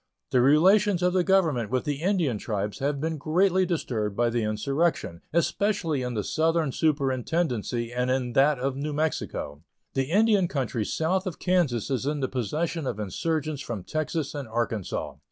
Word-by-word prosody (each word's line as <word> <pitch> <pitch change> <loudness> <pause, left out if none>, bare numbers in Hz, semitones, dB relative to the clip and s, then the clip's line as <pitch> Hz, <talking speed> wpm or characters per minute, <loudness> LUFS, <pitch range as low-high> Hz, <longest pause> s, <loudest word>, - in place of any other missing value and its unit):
The 125 - +4
relations 185 - +4
of 180 0 +3
the 185 -1 +3
Government 160 - +2
with 130 0 0
the 145 0 -3
Indian 170 - +1
tribes 105 -2 -3
have 140 +1 -1
been 160 +1 -2
greatly 185 +5 +2
disturbed 110 - -2
by 120 +1 +2
the 120 0 0
insurrection, 110 - -1
especially 170 -2 0
in 125 -1 -3
the 105 - -1
southern 160 - +1
superintendency 130 -4 0
and 125 +1 0
in 130 -2 0
that 140 +3 +4
of 130 +1 -2
New 145 +2 -3
Mexico. 145 - -2 0.3
The 135 - +1
Indian 200 +3 +3
country 125 -7 -2
south 185 - 0
of 175 - -4
Kansas 155 - +1
is 130 +1 -1
in 150 0 -1
the 130 - 0
possession 150 - -2
of 110 - -3
insurgents 150 - -2
from 110 -8 -5
Texas 155 - -2
and 145 -4 -5
Arkansas. 110 -3 -3
145 Hz, 170 wpm, -26 LUFS, 120-165 Hz, 0.3 s, The